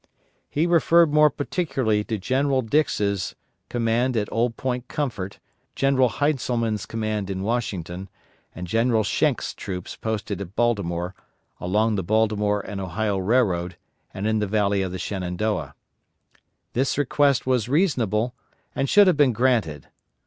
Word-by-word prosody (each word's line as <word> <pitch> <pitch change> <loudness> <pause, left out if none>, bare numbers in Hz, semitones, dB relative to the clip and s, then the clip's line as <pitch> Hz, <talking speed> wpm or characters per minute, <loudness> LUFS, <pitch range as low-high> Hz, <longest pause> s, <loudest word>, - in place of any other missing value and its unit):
He 155 +3 +1
referred 170 -2 +4
more 150 0 +6
particularly 135 - -1
to 110 - -2
General 130 +5 +1
Dix's 105 -7 0 0.3
command 120 +1 +1
at 105 -1 -1
Old 115 0 0
Point 125 -1 -3
Comfort, 115 - -3 0.4
General 135 -2 +3
Heintzelman's 120 -8 -1
command 110 -3 -2
in 95 -1 -3
Washington, 95 -5 -3 0.5
and 90 - -5
General 115 +3 +2
Schenck's - - 0
troops 90 -2 -6
posted 105 -3 -3
at 100 +1 -8
Baltimore, 90 -7 0 0.5
along 105 +4 +1
the 95 - -1
Baltimore 105 +1 +1
and 100 0 -6
Ohio 100 +2 -1
Railroad 95 -5 +1 0.3
and 95 - -5
in 110 0 +1
the 105 - 0
Valley 100 -1 +1
of 95 -1 -2
the 95 - -4
Shenandoah. 90 -4 -3 1.0
This 130 +3 0
request 145 -1 +2
was 125 -3 +1
reasonable 125 - +1 0.4
and 135 0 -1
should 205 0 +7
have 180 -5 +3
been 140 -5 +4
granted. 115 - +1
110 Hz, 135 wpm, -24 LUFS, 100-130 Hz, 1.0 s, should